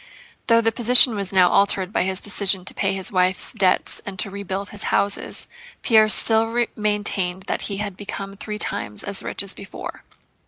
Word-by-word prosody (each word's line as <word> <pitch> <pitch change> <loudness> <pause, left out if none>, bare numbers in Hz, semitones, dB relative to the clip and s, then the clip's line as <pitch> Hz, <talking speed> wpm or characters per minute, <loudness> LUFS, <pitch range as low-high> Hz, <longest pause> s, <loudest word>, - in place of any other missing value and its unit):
Though 230 -1 +4
the 225 0 +1
position 240 +1 +6
was 200 -3 -4
now 185 -2 +4
altered 200 -1 +1
by - - +1
his 190 0 -2
decision 195 -2 -1
to - - +1
pay 195 -1 -1
his 190 -1 -3
wife's 185 -1 +1
debts 195 -5 0
and 195 -2 -8
to 200 +1 -2
rebuild 200 0 -6
his 205 - -5
houses, 200 0 -2 0.4
Pierre 220 -3 +4
still 225 +2 +4
maintained 205 -3 -1
that - - -4
he 200 - -5
had 205 -2 -5
become 200 -1 -7
three 210 +1 -7
times 105 - -2
as 200 -1 -4
rich - - -4
as 195 - -5
before. 195 - -10
200 Hz, 185 wpm, -21 LUFS, 190-215 Hz, 0.4 s, position